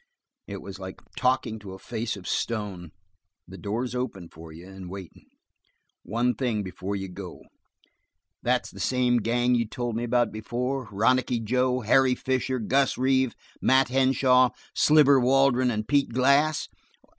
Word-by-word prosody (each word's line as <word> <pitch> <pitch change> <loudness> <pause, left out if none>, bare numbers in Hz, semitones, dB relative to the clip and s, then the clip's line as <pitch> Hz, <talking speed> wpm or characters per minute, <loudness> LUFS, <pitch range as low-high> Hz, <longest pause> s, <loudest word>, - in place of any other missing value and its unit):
It 100 -1 -7
was 95 -1 -9
like 95 -1 -8 0.2
talking 125 -3 0
to 100 -3 -9
a - - -9
face 110 +1 -4
of 95 - -10
stone. 100 -7 -3 0.6
"The - - -11
door's 120 +5 -3
open 110 -9 -4
for 80 0 -12
you, 85 +3 -12
and 95 -2 -10
waitin'. 95 -2 -10 0.7
One 120 +3 0
thing 110 -2 -1
before 95 +1 -5
you 95 -1 -4
go. 90 0 -9 1.0
That's - - 0
the - - -12
same 125 -1 +2
gang 120 +2 +1
you 115 -2 +1
told 120 0 -4
me 115 - -2
about 120 -1 +1
before? 125 +4 -3
Ronicky 125 +4 +2
Joe, 125 +3 0
Harry 130 +3 +3
Fisher, 130 0 -1
Gus 135 +4 +1
Reeve, 130 -1 +1 0.3
Mat 130 -1 +4
Henshaw, 130 -1 +4 0.2
Sliver 145 -3 +5
Waldron 130 0 +3
and 110 -2 -2
Pete 140 -1 +2
Glass?" 140 +5 +2
120 Hz, 150 wpm, -26 LUFS, 105-130 Hz, 1.0 s, Sliver